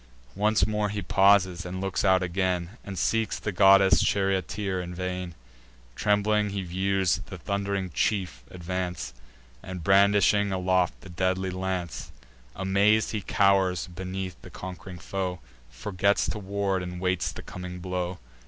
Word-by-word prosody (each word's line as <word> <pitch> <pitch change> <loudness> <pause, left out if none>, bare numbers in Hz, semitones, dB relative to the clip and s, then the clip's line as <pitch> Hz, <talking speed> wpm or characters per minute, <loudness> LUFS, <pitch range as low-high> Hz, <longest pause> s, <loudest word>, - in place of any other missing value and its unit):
Once 105 -1 +3
more 105 0 -1
he 105 +1 -3
pauses, 95 -1 +4
and 90 0 -5
looks 95 -1 -1
out 95 -1 +4
again, 90 -1 -1
And 100 -3 -7
seeks 115 +3 0
the 105 - -3
goddess 95 +1 +6
charioteer 95 0 0
in 90 0 -7
vain. 90 -1 -4 0.6
Trembling 105 0 +2
he 100 -1 -3
views 95 0 0
the 90 - -8
thund'ring 100 0 -2
chief 90 - -1
advance, 90 -4 -4 0.5
And 90 -2 -7
brandishing 100 +1 +4
aloft 95 -1 +1
the 95 - -12
deadly 95 +1 -1
lance: 90 -7 -4 0.4
Amaz'd 100 +3 +2
he 105 - -2
cow'rs 95 -1 +2
beneath 95 -4 -6
his - - -11
conqu'ring 90 0 -8
foe, 90 +2 -3 0.3
Forgets 100 +10 0
to 105 - -5
ward, 100 -1 -1
and 90 0 -6
waits 90 -1 0
the - - -9
coming 90 0 -7
blow. 90 0 -3
95 Hz, 140 wpm, -27 LUFS, 90-100 Hz, 0.6 s, goddess